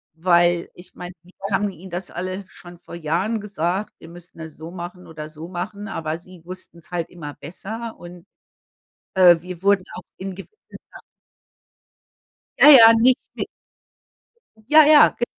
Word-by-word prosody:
weil 175 0 +2
ich 180 +1 -16
meine, 180 0 -8
wir 180 +1 -22 0.2
haben 205 +1 +1
ihnen 185 0 -12
das 175 +1 -5
alles 185 +2 -5
schon 175 -1 -14
vor 170 - -11
Jahren 170 +7 -1
gesagt, 195 -1 -3
wir 165 - -13
müssten 175 0 -14
das 160 -2 -10
so 160 +2 -9
machen 180 0 -9
oder 155 -1 -9
so 155 +1 -9
machen, 195 +4 -6
aber 160 -4 -4
sie 180 0 -16
wussten's 175 -2 -10
halt 175 -2 -3
immer 150 -5 -9
besser 220 +10 -8
und, 175 0 -12 0.9
äh, 180 -2 +6
wir 180 +1 -10
wurden 200 -2 +3
auch - - -9
in 190 0 -6
gewisser 195 - -11 2.1
Ja, 295 - +9
ja, 230 -5 +10
richtig. 255 0 +1 1.2
Ja, 305 +4 +7
ja. 300 -1 +7
Ge 240 - +1
180 Hz, 150 wpm, -21 LUFS, 170-195 Hz, 2.1 s, ja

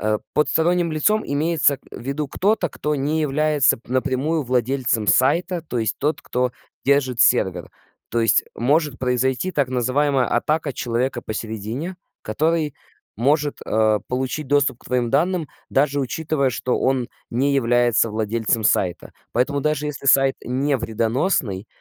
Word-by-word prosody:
э, 110 0 0 0.2
под 150 -2 +2
сторонним 170 +3 +2
лицом 210 +8 +2
имеется, 150 0 +2
э, - - -11
в - - -8
виду 140 +4 -3
кто-то, 200 +3 +1
кто 150 0 -3
не 150 +3 0
является 150 -1 +2
п 120 - -11
напрямую 140 +4 0
владельцем 125 -3 0
сайта, 170 - +2
то 125 -6 -4
есть 110 -3 -1
тот, 150 +3 -1
кто 125 0 -1 0.3
держит 135 -3 +2
сервер. - - +2 0.4
То 120 - 0
есть 115 -3 +3
может 145 +2 +1
произойти, 130 +7 0
так 140 -5 +1
называемая, 130 +2 +1
атака 150 +4 0
человека 120 +1 -2
посередине, 110 - -5 0.3
который 155 +6 0 0.4
может, 145 +5 +1
э, 110 -1 +2
получить 130 +4 -2
доступ 145 -3 +2
к - - -23
твоим 125 -2 0
данным, 175 +2 +1 0.2
даже 140 +1 +1
учитывая, 140 +1 -1
что 125 +2 -1
он 130 -2 0 0.2
не 135 +4 +1
является 120 -3 +2
владельцем 110 +1 -1
сайта. 90 -4 0 0.2
Поэтому 135 +4 +1
даже 150 0 0
если 140 -1 -6
сайт 135 0 +5
не 135 +3 0
вредоносный, 115 - -1
135 Hz, 145 wpm, -22 LUFS, 120-150 Hz, 0.4 s, сайт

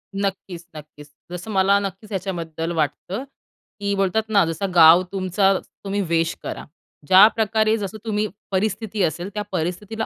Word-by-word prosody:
नक्कीच, 195 -3 -4
नक्कीच. 150 -1 -12 0.2
जसं 180 +5 -6
मला 195 0 +3
नक्कीच 200 +2 -6
याच्याबद्दल 170 -4 -4
वाटतं, 165 - -2 0.6
की 200 0 -1
बोलतात 195 +3 +1
ना 200 -3 +4
जसं 165 +4 -3
गाव 165 +1 +8
तुमचा 195 0 +2
तुम्ही 200 0 -5
वेश 165 0 +1
करा. - - -6 0.4
ज्या 190 +4 +9
प्रकारे 220 0 +2
जसं 210 0 -5
तुम्ही 215 -1 0 0.2
परिस्थिती 210 +2 -1
असेल 175 +3 -2
त्या 210 0 -3
परिस्थितीला 190 +6 -3
195 Hz, 145 wpm, -22 LUFS, 175-210 Hz, 0.6 s, ज्या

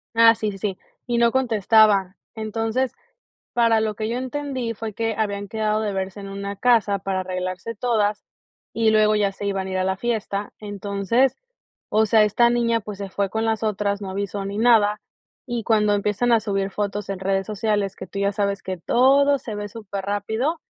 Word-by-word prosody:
Ah, 230 0 +7
sí, 215 -1 -2
sí, 195 - -9
sí, 195 -1 -3 0.3
y 240 -1 0
no 235 0 +4
contestaba. 215 -5 +3 0.2
Entonces, 225 +3 -1 0.6
para 230 -2 +3
lo 215 -1 -1
que 215 +1 -3
yo 235 - -2
entendí, 260 -2 -3
fue 225 0 -5
que 225 +2 -2
habían 205 -2 -2
quedado 215 +1 -1
de 210 -2 -1
verse 190 +1 -4
en 200 -1 -7
una 200 +1 -5
casa 220 -4 +3
para 190 0 -2
arreglarse 185 +4 -4
todas 210 -3 0 0.5
y 225 -1 +2
luego 215 0 +4
ya 205 -2 +2
se 200 +1 -6
iban 195 -1 -2
a - - -5
ir 190 - -1
a 185 - +1
la 190 0 0
fiesta. 210 -2 -2
Entonces, 205 +5 0 0.5
o 220 +1 +3
sea, 215 0 +5
esta 235 +3 +3
niña, 235 -1 +1
pues 205 -1 -8
se 200 -1 -5
fue 195 0 -2
con 220 +2 -1
las 225 -1 0
otras, 205 -1 -1
no 190 - -5
avisó 200 +1 -3
ni 200 +1 -4
nada 215 -3 +4 0.5
y 240 -2 -3
cuando 210 -2 +2
empiezan 210 +4 +1
a 230 - +5
subir 195 -2 -1
fotos 205 0 -3
en 195 -2 -4
redes 195 0 0
sociales, 205 -2 -1
que 185 - -9
tú 200 - -6
ya 200 0 +1
sabes 200 -1 -1
que 185 0 -3
todo 275 +8 +4
se 225 -3 -7
ve 205 0 -5
súper 200 -3 -6
rápido 220 +10 -1
210 Hz, 200 wpm, -23 LUFS, 200-230 Hz, 0.6 s, Ah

